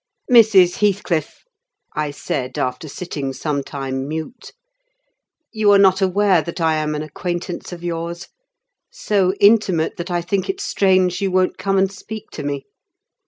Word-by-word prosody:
"Mrs. 205 -7 +6
Heathcliff," 190 -6 -1 0.5
I 150 -1 -1
said, 130 -3 -4
after 125 +5 -2
sitting 145 -3 -5
some 145 0 -2
time 135 -1 -4
mute, 160 - -6 1.0
"you 215 -2 +2
are 200 - +7
not 195 -1 +4
aware 190 -1 +3
that 170 +2 -7
I 160 -1 +2
am 155 0 -1
an 150 - -3
acquaintance 175 +4 -5
of 175 -1 -9
yours? 170 +2 -4 0.6
so 205 - 0
intimate 200 -6 +3
that 170 +2 -5
I 175 -1 -1
think 190 - -2
it 385 0 -2
strange 185 - +2
you 195 - +1
won't 185 0 +1
come 195 0 0
and 190 0 +2
speak 215 +2 -9
to - - -7
me. 140 -1 -4
180 Hz, 155 wpm, -20 LUFS, 155-195 Hz, 1.0 s, are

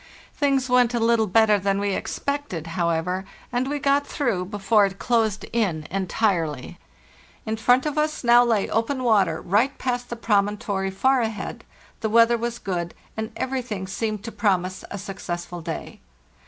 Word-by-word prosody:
Things 275 -3 +1
went 250 -1 +3
a - - +1
little 230 -1 +3
better 210 +1 +4
than 195 +1 0
we 200 -1 0
expected, 280 - -3
however, 170 +2 0 0.3
and 250 +2 0
we 290 - -1
got 280 0 +2
through 230 -11 -1
before 205 +1 +2
it 195 0 -9
closed 220 -3 0
in 185 -10 0
entirely. 175 - -1 0.7
In 220 0 -1
front 245 +4 +3
of 300 0 -1
us 305 -1 -1
now 240 0 +7
lay 225 -4 +1
open 255 +4 -1
water 195 -9 +3
right 220 +9 +1
past 245 -1 -2
the 240 - -4
promontory 205 -3 0
far 260 +7 +2
ahead; 220 -2 -4 0.4
the 220 - -1
weather 230 +2 +5
was 235 0 -2
2 - - -19
good, 175 -3 -3 0.2
and 220 0 -4
everything 250 -7 -3
seemed 215 +2 -3
to 230 - -6
promise 185 -4 0
a - - -5
successful 175 -3 -6
day. - - -6
220 Hz, 165 wpm, -24 LUFS, 190-245 Hz, 0.7 s, now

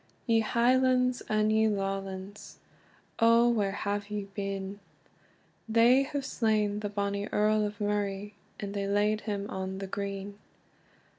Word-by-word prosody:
YE 230 -2 +3
Highlands, 250 +2 +2
and 215 0 +2
ye 220 0 +4
Lawlands 195 -1 -4 0.6
Oh 230 +1 +5
where 210 -5 +1
have 205 0 -3
you 205 -1 -4
been? 195 0 -4 0.9
They 235 +4 +5
have 275 0 -3
slain 215 -4 +1
the 200 -1 -2
Earl 215 0 +2
of 205 0 -9
Murray, 205 0 -2 0.3
And 200 -1 -5
they 200 -1 -2
layd 210 +1 +1
him 205 -1 -3
on 190 0 -4
the 195 - -4
green. 200 +1 -5
205 Hz, 130 wpm, -29 LUFS, 200-220 Hz, 0.9 s, Oh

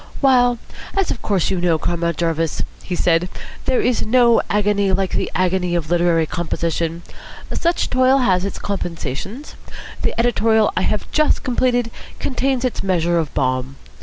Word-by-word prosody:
"While, 245 -3 +4 0.4
as 390 -3 +1
of 235 - -4
course 195 -4 0
you 185 -2 -1
know, 170 -2 +2
Comrade 170 0 -1
Jarvis," 165 -2 -1 0.2
he 180 - -4
said, 175 +1 +2 0.4
"there 255 - +2
is 245 0 +1
no 235 0 +4
agony 205 -1 +2
like 190 0 0
the - - -1
agony 180 -1 +1
of 165 -1 -2
literary 170 -2 +3
composition, 170 0 -2 0.5
such 340 +1 0
toil 255 +1 +4
has 185 -9 +2
its 200 - -4
compensations. 190 - -5 0.5
The - - -2
editorial 225 -2 +3
I - - +1
have 210 +2 -1
just 305 -1 +2
completed 245 -2 +1 0.3
contains 260 -1 -1
its 250 - -2
measure 175 -3 +1
of 160 -3 -2
balm. 130 0 -1
190 Hz, 155 wpm, -20 LUFS, 170-245 Hz, 0.5 s, While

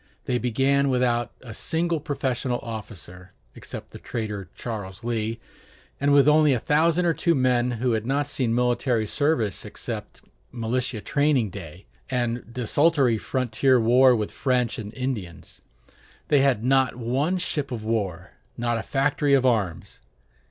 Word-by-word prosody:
They 125 -1 0
began 135 +4 +2
without 120 -2 +1
a 115 -4 -9
single 165 +6 -1
professional 135 -4 -2
officer, 95 -5 -8 0.2
except - - -9
the - - -10
traitor 105 -5 -5
Charles 105 -3 -6
Lee; 115 -1 -2 0.6
and 140 +1 +2
with 140 0 +6
only 150 -1 +5
a - - -1
thousand 165 +6 +2
or 170 - +3
two 170 +1 +1
men 125 -2 +2
who 120 +2 0
had 110 -2 0
not 140 +4 0
seen 130 -5 -1
military 120 -1 +1
service 115 - 0
except - - -7 0.3
militia 120 0 -2
training 145 -7 +1
day, 90 -2 -10 0.2
and 120 -2 -2
desultory 125 0 +2
frontier 130 +1 +1
warfare 125 +3 +5
with 105 -2 -2
French 125 -1 0
and 105 -1 -6
Indians. 120 -10 -5 0.7
They 145 - +5
had 130 -6 +2
not 130 -1 +3
one 130 +9 0
ship 150 -6 -3
of 110 -3 -5
war, 105 -7 -2 0.3
not 120 -1 0
a - - -2
factory 140 +1 +1
of 130 -1 +2
arms. 105 -9 -1
125 Hz, 145 wpm, -25 LUFS, 110-140 Hz, 0.7 s, with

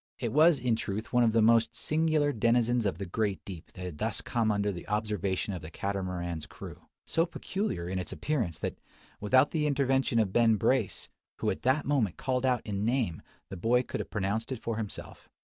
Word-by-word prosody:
It - - -3
was, 155 +2 +6
in 120 -3 +1
truth, 110 +1 -4
one 125 - +5
of 115 - +4
the 115 0 +3
most 115 0 +4
singular 155 -2 +1
denizens 115 0 +2
of 95 - -2
the 100 - -4
great 100 +2 -1
deep 90 -5 -9
that 90 - -7
had 85 -4 -6
thus - - 0
come 115 -2 0
under 100 0 +1
the 85 -3 -8
observation 105 -2 -1
of 90 - -5
the 80 - -8
Catamaran's 90 -4 -3
crew, - - -11 0.2
so 165 +2 +1
peculiar 180 - -3
in 95 +1 -2
its 90 - -5
appearance 115 - -1
that, - - -4 0.4
without 130 +7 +4
the 150 -2 +1
intervention 135 -3 +1
of 105 -4 +2
Ben 115 -2 +5
Brace, 115 0 +1 0.3
who - - 0
at - - -5
that 130 +4 +2
moment 130 - +1
called 130 0 0
out 125 -2 +1
in 100 -1 -2
name, 115 - 0 0.3
the 95 - -6
boy 120 +7 +3
could - - -5
have - - -5
pronounced 105 +4 -2
it 130 - -3
for 115 -2 -2
himself. 110 -3 -7
110 Hz, 205 wpm, -30 LUFS, 95-130 Hz, 0.4 s, was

